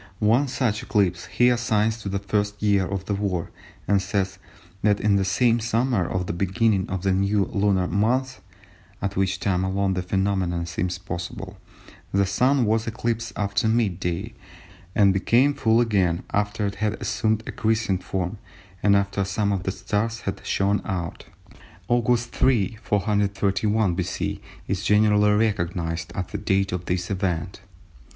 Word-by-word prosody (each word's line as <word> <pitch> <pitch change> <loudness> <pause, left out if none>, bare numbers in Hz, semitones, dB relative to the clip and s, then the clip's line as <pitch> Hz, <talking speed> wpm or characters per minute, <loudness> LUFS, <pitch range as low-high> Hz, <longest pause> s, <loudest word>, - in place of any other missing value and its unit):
One 115 +8 +3
such 125 -5 -1
eclipse 95 -8 0
he 125 0 +3
assigns 115 -2 +1
to 100 - -4
the 100 - -1
first 105 +1 -1
year 100 -3 +3
of 95 -1 -4
the 100 - -2
war 100 -4 -2 0.4
and 100 0 +3
says 95 -1 -2 0.4
that 105 -1 +3
"in 105 -1 +2
the 100 - +2
same 115 +5 +2
summer, 115 -3 0
at 90 0 -1
the - - -3
beginning 95 +2 +1
of 95 0 -3
a 95 - +3
new 100 +1 +2
lunar 100 -2 +1
month 125 +7 0 0.6
(at 100 0 -3
which 95 -1 0
time 95 -2 0
alone 95 0 0
the 90 - -1
phenomenon 95 -2 0
seems 85 +1 -2
possible) 90 -2 -6 0.5
the 100 0 +3
Sun 125 +6 +2
was 110 +1 +1
eclipsed 115 0 -2
after 100 +1 0
mid 110 -6 +1
day, 95 +5 -3 0.6
and 100 -2 +5
became 120 +8 +3
full 115 -3 +2
again 95 -8 +1
after 105 +1 0
it 100 0 -2
had 110 0 0
assumed 110 0 0
a - - -5
crescent 110 -4 0
form 95 +2 -3 0.4
and 100 -1 +4
after 100 0 +1
some 100 +2 0
of 100 -2 -1
the 95 - -2
stars 115 +4 -2
had 100 - -5
shone 100 +1 +1
out." 90 -5 -4 0.7
Aug. 120 0 +3
3, 115 -2 +1
431 105 -1 +1
B.C. 90 +1 -3 0.3
is 100 0 -2
generally 105 0 +4
recognised 85 -6 -1
as 95 - -2
the 105 - -3
date 100 -1 +1
of 90 -1 -3
this 90 +1 -2
event. 90 -2 -2
100 Hz, 160 wpm, -24 LUFS, 95-110 Hz, 0.7 s, and